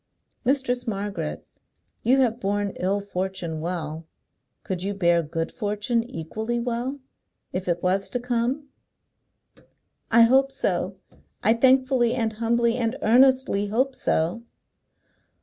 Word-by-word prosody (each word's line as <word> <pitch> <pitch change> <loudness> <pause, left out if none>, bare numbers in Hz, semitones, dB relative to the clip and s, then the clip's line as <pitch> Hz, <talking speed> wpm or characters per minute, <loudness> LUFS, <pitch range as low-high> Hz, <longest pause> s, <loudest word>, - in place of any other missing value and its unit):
"Mistress 250 -2 0
Margaret, 195 -6 -3 0.6
you 260 +4 +4
have 240 -2 +1
borne 205 -1 -1
ill 195 +3 0
fortune 185 -4 -4
well. 160 -2 -4 0.6
Could 185 -2 -3
you 200 +2 -2
bear 175 -3 +3
good 165 +1 -3
fortune 210 +2 -1
equally 220 +9 -3
well, 245 +3 -2 0.5
if 185 0 -3
it 175 -1 -1
was 190 +2 +1
to 245 - -2
come?" 245 +4 -1 1.4
"I 230 +1 +7
hope 265 +3 +4
so. 270 - -1 0.5
I 220 - +5
thankfully 255 0 +3
and 225 -2 0
humbly 235 +1 +1
and 230 0 -1
earnestly 255 -3 +4
hope 260 +6 0
so!" 170 +4 0
225 Hz, 120 wpm, -25 LUFS, 190-245 Hz, 1.4 s, I